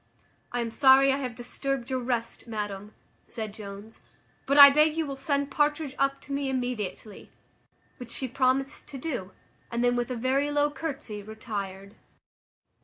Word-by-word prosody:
"I 245 - -1
am 230 -1 -3
sorry 270 +2 +6
I - - 0
have 255 -4 -4
disturbed 260 +1 -4
your 260 - 0
rest, 240 -1 -3
madam," 210 -2 -5 0.3
said 220 -3 -6
Jones, 205 +1 -10 0.5
"but 280 - +2
I 280 -1 +12
beg 305 +2 +4
you 325 - +1
will 275 -1 -5
send 280 0 -1
Partridge 295 -1 0
up 275 0 +1
to - - -12
me 280 -1 -1
immediately;" 245 -5 -4 0.7
which 245 -2 -9
she 260 +2 -2
promised 265 +2 0
to 275 - -8
do, 250 - -4 0.4
and 235 +1 -1
then 245 0 +3
with 240 0 -1
a 250 - -2
very 265 +4 +1
low 290 0 +2
courtesy 280 -9 -5
retired. 200 -2 -7
255 Hz, 165 wpm, -27 LUFS, 225-275 Hz, 0.7 s, I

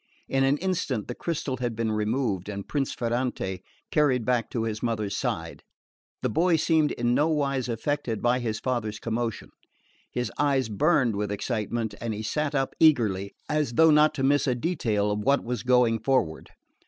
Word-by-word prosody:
In 135 0 +1
an 135 +2 +3
instant 165 - -2
the 120 - -4
crystal 145 -3 -3
had 120 -2 -2
been 115 0 -1
removed, 105 -3 -1
and 100 -1 -6
Prince 140 -3 -1
Ferrante 120 -6 -2 0.3
carried 130 -6 +2
back 125 -2 +1
to 115 - -2
his 110 -2 -3
mother's 105 -4 -1
side. - - -3 0.6
The - - +2
boy 170 +1 +3
seemed 160 -1 +2
in 120 0 0
nowise 140 -3 +1
affected 120 -1 -2
by 120 +1 +2
his 110 -3 -2
father's 115 -5 -2
commotion. 115 +1 -3 0.6
His 125 0 -2
eyes 140 -4 +2
burned 125 -1 +2
with 105 0 -2
excitement, 110 +1 -2
and 115 -1 -2
he 110 - -5
sat 150 +6 -1
up 135 -1 0
eagerly, 105 -11 +3
as 150 -5 0
though 160 +6 +6
not 150 0 +5
to 135 - -2
miss 145 +2 +3
a 125 - +2
detail 115 - 0
of 105 - -1
what 140 +6 +2
was 120 -1 -3
going 125 -2 +3
forward. 110 -10 0
120 Hz, 175 wpm, -26 LUFS, 110-140 Hz, 0.6 s, though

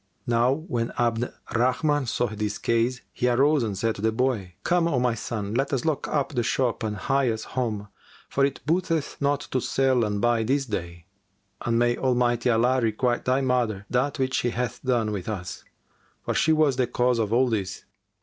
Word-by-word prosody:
Now 120 +1 +3
when 140 -7 -3
Abd 120 0 +1
al - - -11 0.2
Rahman 130 +4 +1
saw 120 - 0
this 105 -2 -3
case, 115 +2 0
he 125 - +1
arose 140 +4 +3
and 105 -4 -2
said 115 +3 0
to 100 - -9
the 110 +1 +2
boy, 110 -7 -1
"Come, 175 -1 +2
O 140 -7 +1
my 125 -1 +2
son, 105 -2 -4
let 135 +4 0
us 130 0 -1
lock 155 -3 0
up 145 -1 -1
the 125 - +1
shop 120 +1 0
and 110 -1 -2
hie 135 +3 +1
us 110 -1 -2
home, 110 -5 -3 0.4
for 140 - 0
it 140 0 0
booteth 165 -1 0
not 140 0 +1
to 130 - -2
sell 130 -2 +2
and 105 -1 -1
buy 120 +1 +2
this 135 +5 +1
day; 85 -7 -5 0.6
and 115 -1 0
may 120 0 +2
Almighty 125 -2 +1
Allah 125 +3 +3
requite 120 +2 0
thy 130 +2 +2
mother 120 -6 0
that 130 +4 +1
which 130 -1 -1
she 120 - +1
hath 120 0 -3
done 120 -5 +1
with 100 -1 -4
us, 95 -5 -5 0.6
for - - 0
she 160 - +2
was 155 -4 +3
the 125 -2 +2
cause 125 0 +1
of 110 -2 0
all 125 +3 +4
this!" 100 -4 -3
120 Hz, 200 wpm, -25 LUFS, 110-135 Hz, 0.6 s, all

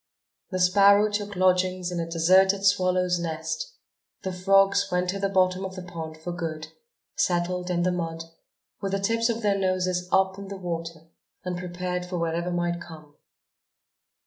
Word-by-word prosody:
The 185 - -3
sparrow 200 +3 +5
took 205 0 -3
lodgings 185 0 +1
in 175 - -3
a 165 0 -3
deserted 190 +4 +4
swallow's 185 -2 +2
nest; 170 - -4 0.5
the 190 - -3
frogs 195 +2 +3
went 180 0 0
to 195 - -5
the 195 0 0
bottom 185 -1 +2
of 190 -1 -5
the 185 - -7
pond 160 -3 -7
for 160 +3 -6
good, 160 -3 -5 0.5
settled 180 0 0
in 175 -1 0
the 180 - +2
mud, 165 -2 -3 0.6
with 195 -1 -3
the 195 - +1
tips 230 +4 +1
of 230 -1 -2
their 200 -1 +2
noses 185 -1 0
up 190 0 +2
in 200 - -8
the 195 0 -7
water 165 -3 -5 0.4
and 180 -1 -3
prepared 180 0 -4
for 180 0 -4
whatever 170 +1 -1
might 175 0 -1
come. 155 -3 -12
180 Hz, 170 wpm, -26 LUFS, 175-195 Hz, 0.6 s, sparrow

